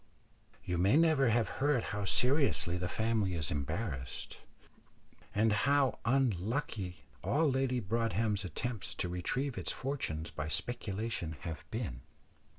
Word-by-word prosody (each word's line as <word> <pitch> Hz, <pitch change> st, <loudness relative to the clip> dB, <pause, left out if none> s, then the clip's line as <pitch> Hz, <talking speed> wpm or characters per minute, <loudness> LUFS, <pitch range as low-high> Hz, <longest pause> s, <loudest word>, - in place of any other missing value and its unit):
You 90 Hz, -1 st, -1 dB
may 100 Hz, +10 st, +5 dB
never 155 Hz, -6 st, +5 dB
have 115 Hz, 0 st, +3 dB
heard 145 Hz, -4 st, +3 dB
how 105 Hz, -1 st, -2 dB
seriously 125 Hz, -, +3 dB
the 90 Hz, 0 st, -2 dB
family 110 Hz, -4 st, +1 dB
is 80 Hz, -3 st, -1 dB
embarrassed, 65 Hz, -2 st, -3 dB, 1.0 s
and 110 Hz, +1 st, +4 dB
how 140 Hz, +3 st, +3 dB
unlucky 110 Hz, -, 0 dB, 0.2 s
all 155 Hz, +3 st, +3 dB
Lady 130 Hz, -1 st, +1 dB
Broadhem's 110 Hz, -1 st, 0 dB
attempts 110 Hz, +1 st, -4 dB
to -, -, -1 dB
retrieve 120 Hz, +10 st, -1 dB
its -, -, -2 dB
fortunes 105 Hz, -, -3 dB
by 75 Hz, +1 st, -4 dB
speculation 100 Hz, -3 st, -2 dB
have 85 Hz, -1 st, -5 dB
been. 105 Hz, -, -4 dB
110 Hz, 125 wpm, -33 LUFS, 90-130 Hz, 1.0 s, may